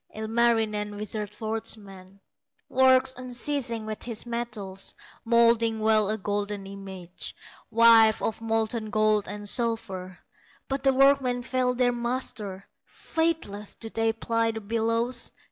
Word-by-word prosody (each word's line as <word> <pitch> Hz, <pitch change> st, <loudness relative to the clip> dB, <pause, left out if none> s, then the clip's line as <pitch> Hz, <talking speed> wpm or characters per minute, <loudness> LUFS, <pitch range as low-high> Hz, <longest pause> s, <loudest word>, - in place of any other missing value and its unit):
Ilmarinen, 220 Hz, -2 st, +1 dB
wizard 210 Hz, 0 st, -4 dB
forgeman, 210 Hz, -3 st, -5 dB, 0.5 s
Works 260 Hz, 0 st, +4 dB
unceasing 245 Hz, -2 st, -3 dB
with 215 Hz, -1 st, -5 dB
his 230 Hz, -2 st, -3 dB
metals, 215 Hz, -5 st, -4 dB, 0.3 s
Moulding 230 Hz, -1 st, +3 dB
well 215 Hz, -1 st, +3 dB
a 215 Hz, -, 0 dB
golden 205 Hz, 0 st, -3 dB
image, 190 Hz, -3 st, -8 dB, 0.3 s
Wife 225 Hz, -1 st, +6 dB
of 225 Hz, -, -2 dB
molten 225 Hz, 0 st, -1 dB
gold 215 Hz, -1 st, +2 dB
and 205 Hz, 0 st, -6 dB
silver; 200 Hz, -6 st, -1 dB, 0.5 s
But 270 Hz, +1 st, -3 dB
the 270 Hz, -, +5 dB
workmen 265 Hz, -2 st, +3 dB
fail 255 Hz, 0 st, 0 dB
their 245 Hz, 0 st, +3 dB
master, 235 Hz, -5 st, -3 dB, 0.2 s
Faithless 320 Hz, -12 st, -2 dB
do 225 Hz, -, -8 dB
they 225 Hz, 0 st, +1 dB
ply 230 Hz, 0 st, 0 dB
the 225 Hz, 0 st, -4 dB
bellows. 230 Hz, +3 st, 0 dB
225 Hz, 120 wpm, -27 LUFS, 210-240 Hz, 0.5 s, Wife